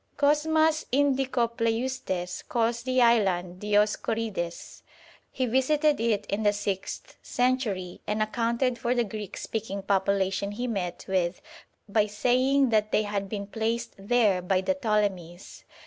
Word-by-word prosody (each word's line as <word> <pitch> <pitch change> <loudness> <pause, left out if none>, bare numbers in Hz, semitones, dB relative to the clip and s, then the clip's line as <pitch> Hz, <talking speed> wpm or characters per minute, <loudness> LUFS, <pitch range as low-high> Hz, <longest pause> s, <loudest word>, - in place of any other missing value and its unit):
Cosmas 315 +2 +3
Indicopleustes 240 -7 0
calls 235 0 0
the 255 0 +2
island 185 -6 +2
Dioscorides. 210 -3 -1 0.5
He 260 - -1
visited 290 +5 +2
it 220 -3 0
in 200 +2 -2
the 205 -1 +3
sixth 200 -2 -4
century, 240 -8 -1
and 210 +1 -1
accounted 235 +3 0
for 240 +2 0
the 240 - +2
Greek 210 -2 -7
speaking 200 -3 -4
population 195 0 0
he 240 +4 -3
met 190 -7 -3
with 185 -2 0 0.5
by 210 +1 +2
saying 255 +5 +2
that 215 -1 +1
they 215 - +3
had 200 -1 -3
been 200 -1 -4
placed 230 +3 -2
there 205 -2 +2
by 185 +1 +1
the 285 - +1
Ptolemies. 200 -8 -2
220 Hz, 130 wpm, -27 LUFS, 200-245 Hz, 0.5 s, Cosmas